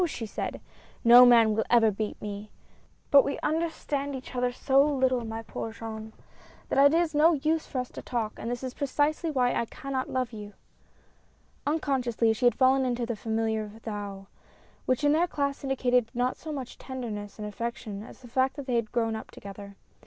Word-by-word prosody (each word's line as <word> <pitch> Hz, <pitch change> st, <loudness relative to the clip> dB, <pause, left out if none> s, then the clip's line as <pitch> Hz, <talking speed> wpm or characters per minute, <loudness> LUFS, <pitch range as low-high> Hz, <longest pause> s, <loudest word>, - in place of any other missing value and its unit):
she 240 Hz, -7 st, -5 dB
said, 210 Hz, -, -4 dB, 0.4 s
"no 245 Hz, +1 st, +9 dB
man 230 Hz, -3 st, +6 dB
will 220 Hz, +1 st, +1 dB
ever 225 Hz, -2 st, +5 dB
beat 210 Hz, +1 st, -4 dB
me. 205 Hz, 0 st, -6 dB, 0.6 s
But 280 Hz, -1 st, +8 dB
we 280 Hz, -, -2 dB
understand 300 Hz, -3 st, -1 dB
each 260 Hz, -1 st, -8 dB
other 250 Hz, 0 st, +1 dB
so 270 Hz, +2 st, +3 dB
little, 260 Hz, -4 st, +1 dB
my 225 Hz, 0 st, -5 dB
poor 225 Hz, +1 st, -5 dB
Jean, 220 Hz, -1 st, -7 dB, 0.6 s
that 275 Hz, -, +4 dB
it 285 Hz, -, +7 dB
is 340 Hz, -2 st, 0 dB
no 310 Hz, +3 st, +5 dB
use 315 Hz, +2 st, 0 dB
for 270 Hz, -, -5 dB
us 250 Hz, -1 st, -2 dB
to -, -, -8 dB
talk, 225 Hz, -3 st, -2 dB
and 230 Hz, -, -5 dB
this 245 Hz, +1 st, -4 dB
is 255 Hz, -1 st, -4 dB
precisely 295 Hz, +4 st, 0 dB
why 255 Hz, -4 st, +2 dB
I 235 Hz, -, 0 dB
cannot 265 Hz, +2 st, -4 dB
love 255 Hz, -2 st, -2 dB
you." 210 Hz, -1 st, -8 dB, 1.1 s
Unconsciously, 255 Hz, -7 st, +1 dB
she 245 Hz, +3 st, -2 dB
had 240 Hz, -, +3 dB
fallen 265 Hz, 0 st, +4 dB
into 245 Hz, -2 st, -1 dB
the 235 Hz, -1 st, -3 dB
familiar 220 Hz, -1 st, -2 dB
thou, 205 Hz, -3 st, -6 dB, 0.6 s
which 255 Hz, +3 st, +1 dB
in 290 Hz, -, +5 dB
their 330 Hz, +4 st, +3 dB
class 280 Hz, -4 st, -2 dB
indicated 250 Hz, -3 st, +1 dB
not 250 Hz, +1 st, 0 dB
so 315 Hz, -, -8 dB
much 265 Hz, -4 st, -6 dB
tenderness 225 Hz, -6 st, -6 dB
and 210 Hz, -1 st, -5 dB
affection, 215 Hz, -2 st, -5 dB
as 225 Hz, -, -12 dB
the -, -, -10 dB
fact 260 Hz, +2 st, +1 dB
that 285 Hz, -, -6 dB
they 250 Hz, -2 st, 0 dB
had 230 Hz, -2 st, -2 dB
grown 225 Hz, -2 st, 0 dB
up 220 Hz, -, -7 dB
together. 200 Hz, 0 st, -10 dB
245 Hz, 190 wpm, -28 LUFS, 220-275 Hz, 1.1 s, no